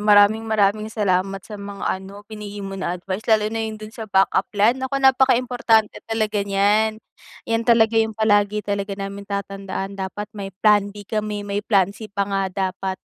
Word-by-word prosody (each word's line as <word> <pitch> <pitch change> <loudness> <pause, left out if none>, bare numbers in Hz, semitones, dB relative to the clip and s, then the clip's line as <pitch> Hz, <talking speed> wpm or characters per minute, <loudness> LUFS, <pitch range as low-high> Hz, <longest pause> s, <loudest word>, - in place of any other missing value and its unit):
maraming, 205 +1 +5
maraming 215 0 +2
salamat 195 -3 0
sa 210 -2 -9
mga 200 0 -7
ano, 200 +2 -11
binigay 205 -2 -7
mo 195 0 -6
na 180 -1 -1
advice, 185 +3 -4
lalo 215 -1 +4
na 225 - -2
yung 220 0 -5
dun 215 0 -8
sa 220 -1 -7
backup 195 0 +2
plan, 210 +3 +5
naku, 265 +1 -3
napaka-importante 250 -4 +3
talaga 215 -2 0
niyan, 210 +2 +2 0.5
'yan 230 0 0
talaga 230 -1 +4
yung 220 0 -1
palagi 210 -1 +2
talaga 200 0 -2
namin 200 0 -6
tatandaan, 195 -1 -4
dapat 205 +2 -5
may 200 -2 -6 0.2
plan 205 -1 +5
B 205 - -8
kami, 210 0 -3
may 200 0 -2
plan 200 -3 +2
C 215 +1 -9
pa 200 0 -1
nga 195 -1 -1 0.2
dapat, 190 0 -4
205 Hz, 180 wpm, -22 LUFS, 195-220 Hz, 0.5 s, maraming